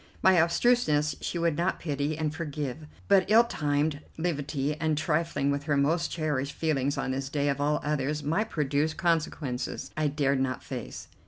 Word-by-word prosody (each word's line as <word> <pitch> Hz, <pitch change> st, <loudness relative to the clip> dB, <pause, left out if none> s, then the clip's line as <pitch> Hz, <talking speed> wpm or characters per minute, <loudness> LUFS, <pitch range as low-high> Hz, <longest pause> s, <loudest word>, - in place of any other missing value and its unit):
My 185 Hz, -3 st, +6 dB
obtuseness 165 Hz, -, +2 dB
she -, -, -3 dB
would 170 Hz, -1 st, +1 dB, 0.2 s
pity 145 Hz, -1 st, -2 dB
and 155 Hz, -1 st, -1 dB
forgive, 150 Hz, -2 st, -5 dB, 0.2 s
but 195 Hz, -1 st, +4 dB
ill 225 Hz, +2 st, +7 dB
timed 145 Hz, -7 st, 0 dB, 0.2 s
levity 145 Hz, -3 st, -1 dB
and 155 Hz, -1 st, 0 dB
trifling 155 Hz, -3 st, 0 dB
with 140 Hz, +1 st, -2 dB
her 145 Hz, -2 st, +1 dB
most 160 Hz, +4 st, +2 dB
cherished 145 Hz, -4 st, -2 dB
feelings 145 Hz, -3 st, 0 dB
on -, -, -1 dB
this 135 Hz, 0 st, -3 dB
day 145 Hz, 0 st, 0 dB
of 140 Hz, 0 st, -1 dB
all 150 Hz, +1 st, +2 dB
others 150 Hz, 0 st, -1 dB
might 190 Hz, +10 st, 0 dB
produce 150 Hz, +1 st, 0 dB
consequences 160 Hz, -7 st, -1 dB
I 155 Hz, -1 st, +1 dB
dared 140 Hz, -2 st, +1 dB
not 130 Hz, -1 st, -1 dB
face. -, -, -7 dB
150 Hz, 165 wpm, -28 LUFS, 140-165 Hz, 0.2 s, ill